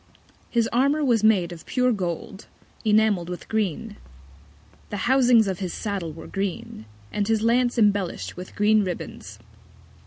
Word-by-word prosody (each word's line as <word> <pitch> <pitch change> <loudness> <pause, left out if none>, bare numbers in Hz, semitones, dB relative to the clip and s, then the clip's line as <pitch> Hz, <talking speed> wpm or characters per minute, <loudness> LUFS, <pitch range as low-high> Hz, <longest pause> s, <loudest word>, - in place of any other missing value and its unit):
His 230 -2 +1
Armour 280 +5 +2
was 235 -5 +2
made 195 -6 +3
of 170 -2 -10
pure 250 -1 +2
Gold, 190 -1 -4 0.4
enamell'd 210 -5 +2
with 180 - -7
Green. 215 0 -2 0.9
The 205 -2 -3
Housings 245 -4 +5
of 190 -2 -2
his 185 -3 -4
Saddle 200 -6 -3
were 165 +2 -10
green, 195 - -4 0.3
and 205 -1 -1
his 220 -1 +1
Lance 240 +2 +2
embellish'd 205 -5 +1
with 180 +1 -10
green 210 +1 +3
Ribbands. 180 -2 -6
210 Hz, 145 wpm, -24 LUFS, 185-230 Hz, 0.9 s, Housings